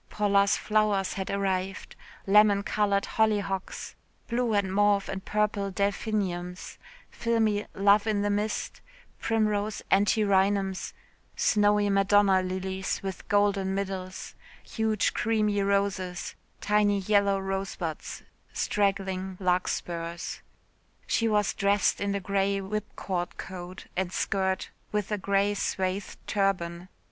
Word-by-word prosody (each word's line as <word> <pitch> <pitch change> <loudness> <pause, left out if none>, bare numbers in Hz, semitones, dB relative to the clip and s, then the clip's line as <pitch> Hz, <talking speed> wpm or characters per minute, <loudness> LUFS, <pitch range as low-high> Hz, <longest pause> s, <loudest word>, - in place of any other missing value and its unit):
Paula's 200 -1 +3
flowers 210 -3 +1
had 190 -1 -4
arrived 195 -1 -2 0.3
lemon 205 0 +5
coloured 200 -1 +1
hollyhocks, 205 -3 -1 0.3
blue 235 -2 0
and 195 -2 0
mauve 205 0 +3
and 190 0 -5
purple 210 -1 0
delphiniums, 190 -2 -2 0.3
filmy 220 -3 0
love 200 +2 +4
in 205 -2 +1
the 205 - +1
mist, 210 +1 -2 0.4
primrose 215 -2 0
antirrhinums, 195 -1 +2 0.4
snowy 205 -1 +3
Madonna 195 -1 +4
lilies 190 +1 -3
with 190 -1 -6
golden 200 -2 +2
middles, 190 -2 -4 0.3
huge 220 -2 0
creamy 215 -2 +1
roses, 195 -2 -1 0.3
tiny 205 -1 +3
yellow 200 0 +3
rosebuds, 195 -4 -4 0.3
straggling 190 -2 -1
larkspurs. 175 -2 -2 0.6
She 230 - +1
was 210 -2 +2
dressed 200 +1 +2
in 200 0 0
a - - 0
grey 200 +1 0
whipcord 195 -3 -4
coat 185 0 -8
and 185 -1 -1
skirt 190 -1 -1 0.2
with 210 -1 -2
a 210 - 0
grey 200 +1 +1
swathed 190 -1 -2
turban. 185 -3 -1
200 Hz, 110 wpm, -28 LUFS, 190-205 Hz, 0.6 s, lemon